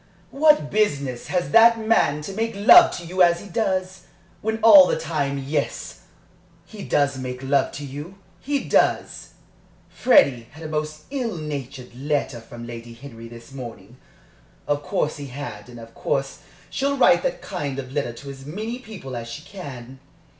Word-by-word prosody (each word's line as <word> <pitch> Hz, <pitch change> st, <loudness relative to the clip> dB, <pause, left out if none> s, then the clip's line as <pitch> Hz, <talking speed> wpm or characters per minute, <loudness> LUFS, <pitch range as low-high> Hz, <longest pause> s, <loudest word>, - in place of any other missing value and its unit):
What 300 Hz, -, +4 dB
business 140 Hz, -, 0 dB
has 180 Hz, -1 st, -1 dB
that 230 Hz, +1 st, +7 dB
man 185 Hz, -10 st, +2 dB
to 195 Hz, -, -6 dB
make 225 Hz, +2 st, -2 dB
love 340 Hz, -, +8 dB
to 175 Hz, -, -8 dB
you 185 Hz, +2 st, -1 dB
as 170 Hz, -1 st, +5 dB
he 205 Hz, -, -11 dB
does, 190 Hz, -2 st, -2 dB, 0.3 s
when 220 Hz, +1 st, -1 dB
all 200 Hz, -5 st, +9 dB
the -, -, 0 dB
time 150 Hz, -4 st, -2 dB
Yes, 140 Hz, +2 st, -4 dB, 0.6 s
he 205 Hz, +3 st, -10 dB
does 140 Hz, -2 st, +1 dB
make 125 Hz, 0 st, -6 dB
love 135 Hz, 0 st, +1 dB
to 145 Hz, -, -6 dB
you 145 Hz, +7 st, -8 dB, 0.2 s
he 285 Hz, 0 st, -2 dB
does! -, -, 0 dB, 0.6 s
Freddie 130 Hz, -, +3 dB
had 160 Hz, +2 st, -11 dB
a -, -, -5 dB
most 155 Hz, 0 st, -4 dB
ill 245 Hz, -9 st, -3 dB
natured 140 Hz, -5 st, -6 dB
letter 135 Hz, -2 st, -2 dB
from 120 Hz, +1 st, -10 dB
Lady 120 Hz, 0 st, -9 dB
Henry 115 Hz, -2 st, -11 dB
this 115 Hz, +2 st, -13 dB
morning. 120 Hz, -4 st, -10 dB, 0.7 s
Of 145 Hz, 0 st, -1 dB
course 150 Hz, +1 st, -2 dB
he 145 Hz, -1 st, -7 dB
had 135 Hz, -1 st, -8 dB
and 120 Hz, -1 st, -11 dB
of 115 Hz, 0 st, -12 dB
course 135 Hz, 0 st, -2 dB, 0.3 s
she'll 280 Hz, +1 st, -1 dB
write -, -, +5 dB
that -, -, -3 dB
kind 145 Hz, -8 st, -4 dB
of 130 Hz, -1 st, -7 dB
letter 140 Hz, -5 st, -2 dB
to 140 Hz, +4 st, -9 dB
as 135 Hz, -1 st, -11 dB
many 215 Hz, -, -5 dB
people 195 Hz, -, -9 dB
as 115 Hz, -1 st, -6 dB
she 120 Hz, +6 st, -8 dB
can. 135 Hz, -9 st, -10 dB
145 Hz, 170 wpm, -23 LUFS, 130-195 Hz, 0.7 s, all